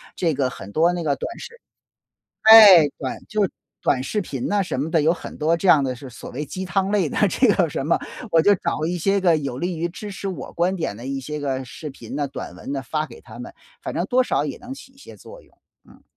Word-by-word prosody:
这 165 -5 0
个 130 -2 0
很 100 -3 -10
多 170 +6 +3
那 175 -1 -3
个 145 -3 +1
短 - - -5
视 470 +1 -11 0.9
哎， 210 -8 +10
短 130 - -4
就 215 0 0
是 190 - -2 0.3
短 130 - +1
视 210 +10 -2
频 135 -7 -5
呐 205 -1 +1
什 180 - -3
么 155 +4 -3
的， 160 -2 +2
有 160 +3 +4
很 - - -8
多 155 +2 +1
这 185 +3 -1
样 145 -5 +6
的 130 - -2
是 130 +2 -10
所 - - -10
谓 145 +4 -5
鸡 185 +6 -5
汤 190 +2 -1
类 195 -7 +1
的 - - -3
这 255 +7 +2
个 180 -5 +2
什 140 -1 -4
么。 170 - +2 0.3
我 165 - +5
就 205 +4 +5
找 155 -3 -2
一 175 +1 -2
些 195 +3 +1
个 170 -3 +4
有 135 -4 -4
利 175 0 -3
于 170 +2 -1
支 205 +4 -8
持 195 - -7
我 175 -9 -7
观 180 +3 0
点 160 - -3
的 120 - -9
一 135 0 -3
些 150 +4 -5
个 135 -2 -2
视 150 +5 -8
频 135 - -9
呢， 145 -1 -1
短 140 - -8
文 140 - -7
呢， 135 - -3
发 155 +3 -2
给 120 - -14
他 115 0 -13
们， 125 - -8 0.3
反 - - -5
正 175 - -1
多 255 +4 +3
少 - - 0
也 - - -5
能 245 +2 -9
起 265 - -14
一 270 - -27
些 280 - -13
作 - - -13
用。 - - -26 0.3
嗯。 - - -19
165 Hz, 280 characters per minute, -22 LUFS, 140-190 Hz, 0.9 s, 哎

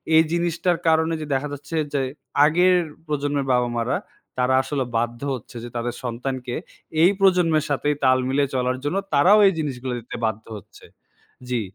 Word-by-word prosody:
এই 160 - +7
জিনিসটার 170 0 0
কারণে 160 +1 +3
যে - - -4
দেখা 135 +2 0
যাচ্ছে 145 +3 -7 0.2
যে, 140 - +1 0.4
আগের 180 +4 +4 0.3
প্রজন্মের 145 -1 -1
বাবা-মা 120 -1 +1
রা - - +1 0.4
তারা 125 +1 +2
আসলে 135 0 -2
বাধ্য 120 +1 -2
হচ্ছে 120 0 -12
যে, 120 - -7
তাদের 120 +1 -3
সন্তানকে 125 +1 -4 0.5
এই 180 - +6
প্রজন্মের 175 -5 +3
সাথে 145 +1 0
তাল 130 0 +5
মিলে 140 +2 +2
চলার 125 0 0
জন্য 145 +6 -1 0.2
তারাও 185 +9 +6
এই 195 - +3
জিনিসগুলো 130 -4 -3
দিতে 115 - -9
বাধ্য 110 0 -3
হচ্ছে। - - -15 0.6
জি। 125 -2 0
140 Hz, 165 wpm, -23 LUFS, 125-160 Hz, 0.6 s, এই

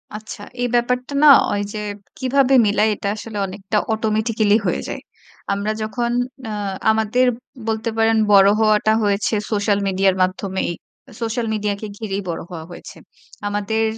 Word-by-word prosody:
আচ্ছা। 215 -1 -8 0.2
এই 245 - +1
ব্যাপারটা 250 +3 0
না 300 - +8 0.3
ওই 205 - 0
যে 215 - -4 0.4
কীভাবে 270 +1 +2
মিলায় 210 +1 +2
এটা 200 - -5
আসলে 215 -1 -7
অনেকটা 195 +2 -3 0.2
অটোমেটিক্যালি 220 -1 +1
হয়ে - - 0
যায়। - - -5 0.5
আমরা 200 +2 -1
যখন 235 +2 -2 0.4
আ - - -4 0.4
আমাদের 220 +3 +2 0.4
বলতে 220 +1 -1
পারেন 225 0 +3 0.2
বড় 195 0 +7
হওয়াটা 215 0 +3
হয়েছে 205 +2 0 0.2
সোশ্যাল 205 -1 +1
মিডিয়ার 190 0 +2
মাধ্যমেই। 190 0 -2 0.5
সোশ্যাল 230 +1 -2
মিডিয়াকে 210 0 -2
ঘিরেই 200 -3 -3
বড় 165 - -3
হওয়া 160 -2 -6
হয়েছে। - - -11 0.5
আমাদের 205 +2 -1
215 Hz, 140 wpm, -20 LUFS, 200-225 Hz, 0.5 s, না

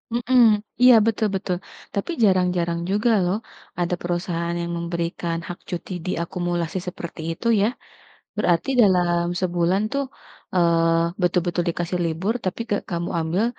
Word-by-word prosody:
Mhm, 245 +1 +3 0.4
iya 250 0 +9
betul 225 -1 +1
betul. 185 -1 -1 0.4
Tapi 200 - -2
jarang-jarang 180 -3 +2
juga 210 +4 +2
loh 180 +3 +1 0.4
ada 175 0 0
perusahaan 175 -1 -2
yang 170 0 -3
memberikan 170 0 -2
hak 175 - -6
cuti 175 +2 -5
diakumulasi 175 0 -2
seperti 170 -2 -6
itu 165 +8 -4
ya. 205 - +4 0.7
Berarti 175 -3 +1
dalam 175 -3 +3 0.2
sebulan 175 +1 +1
tuh, 280 - +1 0.5
eee, 170 0 +2
betul-betul 175 0 +1
dikasih 175 +1 -2
libur, 170 +7 -1
tapi 185 +4 -2
gak 205 - 0
kamu 170 -1 -2
ambil 165 +6 0
175 Hz, 130 wpm, -23 LUFS, 170-190 Hz, 0.7 s, iya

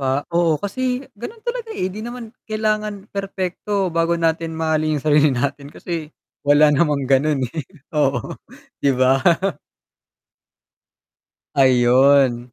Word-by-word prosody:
Ah, 135 +1 0
oo 170 -2 +2
kasi, 250 - -3
ganun 420 - -9
talaga 475 -1 -4
eh. 185 0 -2
'Di 210 - -7
naman 235 0 -7 0.2
kailangan 215 -2 -2
perpekto 195 -1 -2
bago 165 +1 +1
natin 165 0 -1
mahalin 155 -1 0
yung 145 - -6
sarili 150 0 +4
natin 140 +2 -2
kasi 165 0 -6 0.3
wala 145 +1 +5
namang 145 -2 +1
ganun, 140 +2 +2
eh, 165 - -3 0.3
oo, 140 -5 0 0.5
'di 140 - +3
ba? 130 +1 +3 2.3
Ayun. 130 -1 +4
160 Hz, 120 wpm, -20 LUFS, 140-200 Hz, 2.3 s, wala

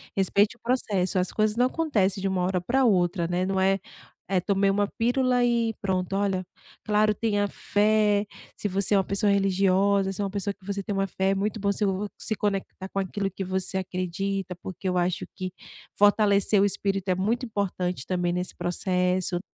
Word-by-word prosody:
respeite 200 +3 +2
o - - -42
processo. 205 -7 0
As 180 - -1
coisas 215 0 +1
não 245 - +4
acontecem 215 - 0
de 195 - 0
uma 185 -1 0
hora 180 -1 0
para 260 +7 +2
outra, 175 -4 +2
né? 180 +1 0
Não 190 0 -1
é, 195 +1 +3 0.5
eh, 185 -2 +2
tomei 200 0 +2
uma 200 +1 +1
pílula 245 +1 +2
e 235 -2 +1
pronto. 190 -1 -1
Olha, 195 -2 0 0.4
claro, 215 0 +3
tenha 205 -2 0
fé, 210 0 +2 0.3
se 205 - -2
você 195 +2 0
é - - +5
uma 195 - +3
pessoa 200 +1 +1
religiosa, 195 0 +2
se 195 - -8
é - - +1
uma 195 - -2
pessoa 200 0 -2
que 195 -1 -22
você 200 0 -3
tem 205 - -5
uma 195 0 0
fé, 190 0 -1
é - - +1
muito 210 +3 -2
bom 200 - +2
se 205 +1 0
o 195 +2 -1
se 220 - -2
conectar 195 -2 -3
com 195 - -2
aquilo 195 0 -2
que 195 - -5
você 190 +1 -2
acredita, 185 +1 -3
porque 185 +1 -4
eu 180 - 0
acho 175 0 0
que 185 0 -4 0.5
fortalecer 205 -1 +4
o - - +5
espírito 195 -1 -1
é 185 - +3
muito 225 +7 0
importante 185 - -2
também 175 -1 0
nesse 180 +1 -3
processo 180 0 0
195 Hz, 200 wpm, -26 LUFS, 185-205 Hz, 0.5 s, é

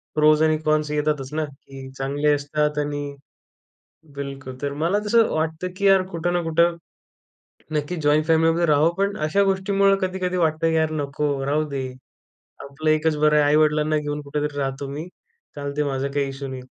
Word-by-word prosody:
Pros 155 0 +4
आणि 155 0 +3
cons 155 0 +2
येतातच 150 -3 -1
ना, 155 0 -1
की 135 -1 -12
चांगले 145 +2 0
असतात 150 +1 -1
आणि 145 -1 -3 1.0
बिलकुल 135 -2 -6
तर 140 0 -2
मला 170 +8 0
तसं 230 +1 +4
वाटतं, 160 +3 -2
की 200 - -1
यार 195 -1 +6
कुठं 175 0 -2
ना 175 - +1
कुठं, 170 +1 +2 1.0
नक्की 150 +4 -2
जॉइंट 150 +1 +3
फॅमिली 165 0 +4
मध्ये 170 +1 +1
राहाव, 150 +1 +4
पण 200 +1 0
अशा 155 +6 +1
गोष्टींमुळे 195 +1 +2
कधी-कधी 185 -1 -2
वाटतं, 160 -1 +1
की 160 - 0
यार 160 0 +2
नको 140 -1 -2
राहू 150 +2 +1
दे. 135 -2 -3 0.8
आपलं 155 +3 -3
एकच 155 0 +2
बरं 150 0 +3
आहे. 150 - +5
आई-वडिलांना 150 +1 +3
घेऊन 150 0 -3
कुठेतरी 145 0 -3
राहतो 135 0 -3
मी. 150 +5 -6 0.5
चालते 140 0 -5
ते 150 - +2
माझा 135 0 -1
काही 140 -1 0
इश्यू 135 0 -6
नाही. 130 -1 -6
150 Hz, 175 wpm, -23 LUFS, 145-165 Hz, 1.0 s, यार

